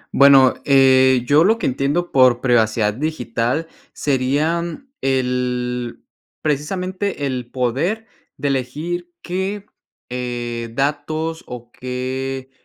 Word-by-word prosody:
Bueno, 140 -2 +7
eh, 130 -2 +5
yo 145 +5 +5
lo 220 +5 +4
que - - -3
entiendo 145 +7 0
por 130 -2 +5
privacidad 110 -4 +2
digital 130 +1 -2 0.3
serían 160 - -1
el 125 -2 -1 0.4
precisamente, 180 +3 -2
el 125 -3 -3
poder 135 - -1 0.3
de 145 - -1
elegir 155 +7 -3
qué, 190 +3 -3 0.4
eh, 120 -1 -4
datos 155 +4 -2
o 120 -1 -9
qué, 130 +1 -4
135 Hz, 100 wpm, -20 LUFS, 125-160 Hz, 0.4 s, Bueno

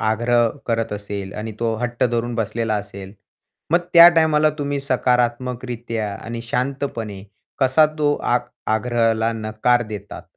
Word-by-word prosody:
आग्रह 120 +2 +2 0.2
करत 115 -2 -1
असेल 100 -1 -5
आणि 110 +1 -5
तो 115 -1 0
हट्ट 120 +2 -1
धरून 120 0 -1
बसलेला 115 0 -1
असेल. 100 -2 -6 0.6
मग 170 - +5 0.2
त्या 170 0 +11
टाईमाला 155 -2 +3
तुम्ही 145 -1 -2
सकारात्मकरित्या, 125 -4 -1
आणि 115 +3 -7
शांतपणे 120 -5 -3 0.4
कसा 135 +3 +4
तो 145 -1 +2
आग् 120 0 -1 0.3
आग्रहाला 115 -1 +1
नकार 110 +2 +1
देतात, 105 -3 -8
120 Hz, 125 wpm, -21 LUFS, 110-125 Hz, 0.6 s, त्या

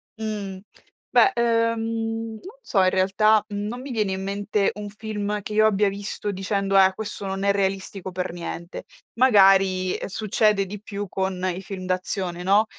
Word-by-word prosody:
Mh. 210 -3 -5 0.5
Beh, 395 - +5
ehm, 230 -1 0
non 385 - -11
so, 195 - +2
in 185 - +5
realtà 205 +3 +3
non 210 +4 -4
mi 270 +1 -7
viene 215 -5 0
in 190 0 -3
mente 200 +1 0
un 205 0 -6
film 210 0 -4
che 210 +1 -6
io 215 0 +4
abbia 210 -1 +3
visto 205 +1 -4
dicendo: 195 0 0
"Eh, 190 -1 +6
questo 205 0 -6
non 195 0 -3
è 200 - +4
realistico 195 -1 -2
per 180 0 -3
niente." 170 0 -6 0.3
Magari, 195 -6 +4
ehm, - - -4
succede 210 0 +1
di 200 +1 -8
più 205 -1 -5
con 190 0 -2
i 190 - -6
film 190 -1 -7
d'azione, 185 -1 -2
no, 200 +4 +4
200 Hz, 170 wpm, -24 LUFS, 190-215 Hz, 0.5 s, Eh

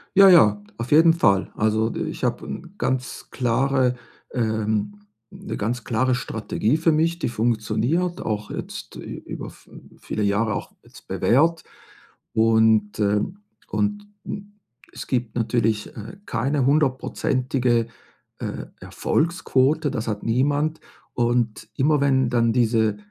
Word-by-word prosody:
Ja, 195 0 +9
ja, 105 - +6 0.2
auf 115 +2 -5
jeden 165 +2 +7
Fall. 100 - +2
Also, 110 +1 +1
ich 160 -5 -4
habe 120 -1 -1
'n 175 0 -7
ganz 130 -1 -2
klare 130 +1 +1 0.4
ähm, 110 -3 -1 0.3
'ne - - -7
ganz 115 +2 -2
klare 125 +4 +1
Strategie 110 +1 -1
für 165 0 +3
mich, 165 +2 +1
die 170 - -1
funktioniert, 120 +10 0
auch 105 -1 -3
jetzt - - -7
ü - - -7
über - - -7
v - - -20
hm, - - -15
viele 110 - -4
Jahre 105 +2 +1
auch - - -5
jetzt - - -17
bewährt. 160 +6 +2 0.7
Und, 110 -2 +3
ähm 105 - 0 0.3
und, 205 0 -1 0.2
hm, 205 0 -7 0.4
es - - -8
gibt 120 -4 -2
natürlich, 110 -2 0
äh, 110 - -8
keine 135 +3 0
hundertprozentige, 130 -4 +1 0.5
äh, - - -5
Erfolgsquote, 155 -3 +1
das 115 -4 -3
hat 105 -2 -3
niemand. 145 +6 0 0.3
Und 120 -2 0
immer 150 +2 +3
wenn 130 -3 +2
dann 115 -1 +2
diese, 110 -3 +2
125 Hz, 130 wpm, -23 LUFS, 110-150 Hz, 0.7 s, Ja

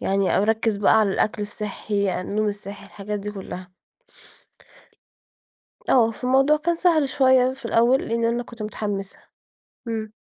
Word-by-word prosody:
يعني 195 -1 +1
او - - +3
أركز 220 0 +1
بقى 210 +2 +4
على 210 -2 +2
الأكل 210 +2 0
الصحّي، 205 -2 -3
النوم 210 +3 -1
الصحّي 200 -1 -7
الحاجات 210 +1 -5
دي 210 +1 -5
كلّها. 185 -2 -9 2.2
آه، 230 -3 +4
فالموضوع 265 +5 +2
كان 340 +3 0
سهل 320 -6 +2
شوية 260 -2 +3
في 265 -3 -12
الأول 235 +4 +3
لأن 230 0 0
أنا 235 +1 0
كنت 235 -1 -12
مُتحمسة. 205 -2 -4 0.7
امم. 220 -1 -4
220 Hz, 140 wpm, -23 LUFS, 205-250 Hz, 2.2 s, بقى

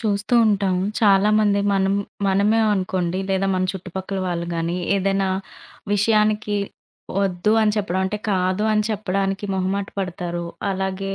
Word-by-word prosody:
చూస్తూ 210 +1 0
ఉంటాం. 200 -3 +1 0.2
చాలామంది, 205 0 +4
మనం 195 0 +2 0.3
మనమే 205 +4 +3
అనుకోండి 185 -2 -1
లేదా 195 0 +1
మన 185 0 +1
చుట్టుపక్కల 190 +1 -5
వాళ్లు 170 -1 -2
గానీ, 170 +1 -1 0.2
ఏదైనా 195 0 +1 0.7
విషయానికి 210 0 +2 0.7
"వద్దు" 190 +2 +1
అని 210 -1 +2
చెప్పడం 190 -3 -1
అంటే, 210 +2 -3
"కాదు" 185 +1 +1
అని 215 0 +2
చెప్పడానికి 195 -1 -1
మొహమాటపడతారు. 185 -2 -3 0.2
అలాగే 190 0 -3
195 Hz, 120 wpm, -22 LUFS, 185-205 Hz, 0.7 s, చాలామంది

